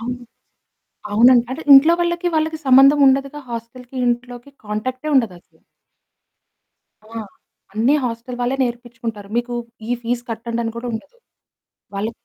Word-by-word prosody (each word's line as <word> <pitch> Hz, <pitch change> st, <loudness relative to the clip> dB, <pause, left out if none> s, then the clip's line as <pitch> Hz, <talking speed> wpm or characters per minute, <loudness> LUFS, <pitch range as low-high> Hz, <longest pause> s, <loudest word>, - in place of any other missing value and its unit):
అవును. 245 Hz, +2 st, -5 dB, 0.9 s
అవునండి. 235 Hz, +3 st, +6 dB
అంటే 265 Hz, +5 st, -5 dB
ఇంట్లో 310 Hz, +5 st, +8 dB
వాళ్ళకి, 345 Hz, +1 st, -1 dB
వాళ్ళకి 315 Hz, 0 st, 0 dB
సంబంధం 270 Hz, +3 st, +6 dB
ఉండదుగా. 275 Hz, +2 st, +1 dB
హోస్టల్‌కి 235 Hz, +2 st, -8 dB
ఇంట్లోకి 245 Hz, +2 st, -3 dB, 0.2 s
కాంటాక్టే 255 Hz, +8 st, -4 dB
ఉండదసలు. 200 Hz, -9 st, -2 dB, 1.4 s
ఆ! -, -, -19 dB, 0.6 s
అన్ని 230 Hz, +8 st, +2 dB
హోస్టల్ 245 Hz, +1 st, -5 dB
వాళ్ళే 250 Hz, +2 st, 0 dB
నేర్పించుకుంటారు. 235 Hz, -4 st, -6 dB
మీకు 240 Hz, 0 st, -1 dB, 0.4 s
ఈ -, -, +2 dB
ఫీస్ 240 Hz, +1 st, -2 dB
కట్టండని 230 Hz, 0 st, -3 dB
కూడా 235 Hz, -, -5 dB
ఉండదు. 285 Hz, -, -7 dB, 0.8 s
వాళ్ళే 215 Hz, +3 st, -2 dB
245 Hz, 120 wpm, -20 LUFS, 230-270 Hz, 1.4 s, ఇంట్లో